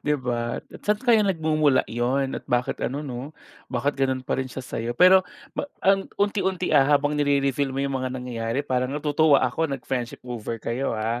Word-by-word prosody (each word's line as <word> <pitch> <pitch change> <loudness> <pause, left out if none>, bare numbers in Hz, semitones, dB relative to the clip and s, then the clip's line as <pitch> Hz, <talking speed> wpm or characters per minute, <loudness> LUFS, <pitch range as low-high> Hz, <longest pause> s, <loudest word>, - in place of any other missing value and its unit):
'Di 150 - +1
ba? 120 -2 -2 0.2
At - - -11
saan 210 0 +2
kaya 230 -4 +5
nagmumula 155 -7 +2
'yon? 130 +4 -1
At - - -20
bakit 125 +1 0
ano, 145 +4 -2
'no, 135 +3 -7 0.3
bakit 140 0 -1
ganon 130 -1 0
pa 130 - -1
rin 130 - -4
siya 130 0 -7
sayo? 115 0 -3
Pero 185 +1 +7 0.3
pa - - -4 0.2
ang 195 0 +3
unti-unti, 190 -3 0
ah, 135 -3 +6
habang 145 +1 -1
nire-reveal 140 -2 +1
mo 135 - 0
'yung 140 - -2
mga 130 - -2
nangyayari 120 0 -3
parang 125 -2 0
natutuwa 150 -1 +3
ako 160 +6 0
nag 135 -3 -5
friendship 125 -3 -4
over 115 -2 -5
kayo, 115 +2 -2
ah. 115 +2 -1
135 Hz, 195 wpm, -24 LUFS, 125-150 Hz, 0.3 s, Pero